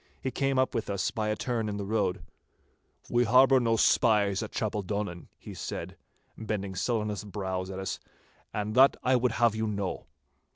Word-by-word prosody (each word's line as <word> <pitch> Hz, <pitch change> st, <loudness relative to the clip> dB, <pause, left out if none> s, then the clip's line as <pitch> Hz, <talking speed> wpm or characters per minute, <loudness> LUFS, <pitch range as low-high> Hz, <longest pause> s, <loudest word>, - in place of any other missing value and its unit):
He 130 Hz, -, -3 dB
came 135 Hz, +1 st, 0 dB
up 130 Hz, 0 st, +2 dB
with 115 Hz, -4 st, -2 dB
us 100 Hz, -1 st, -1 dB
by 110 Hz, -1 st, -2 dB
a 105 Hz, -, +1 dB
turn 115 Hz, -1 st, -2 dB
in 100 Hz, -, -3 dB
the 100 Hz, -, -4 dB
road. 105 Hz, -3 st, -1 dB, 0.9 s
'We 120 Hz, 0 st, +3 dB
harbour 130 Hz, +3 st, +6 dB
no 115 Hz, -2 st, +2 dB
spies 105 Hz, -4 st, +3 dB
at 110 Hz, -, -5 dB
Chapeldonnan,' 105 Hz, -4 st, -3 dB
he -, -, -10 dB
said, -, -, -6 dB, 0.4 s
bending 105 Hz, -3 st, -4 dB
sullenest 105 Hz, 0 st, -2 dB
brows 95 Hz, -2 st, -3 dB
at 95 Hz, -, -6 dB
us, 95 Hz, 0 st, -4 dB, 0.5 s
'and 105 Hz, 0 st, -3 dB
that 135 Hz, +3 st, +6 dB
I 130 Hz, +1 st, +3 dB
would 125 Hz, -1 st, +1 dB
have 120 Hz, -2 st, +3 dB
you 110 Hz, 0 st, -1 dB
know. 100 Hz, -3 st, -3 dB
105 Hz, 175 wpm, -29 LUFS, 100-120 Hz, 0.9 s, harbour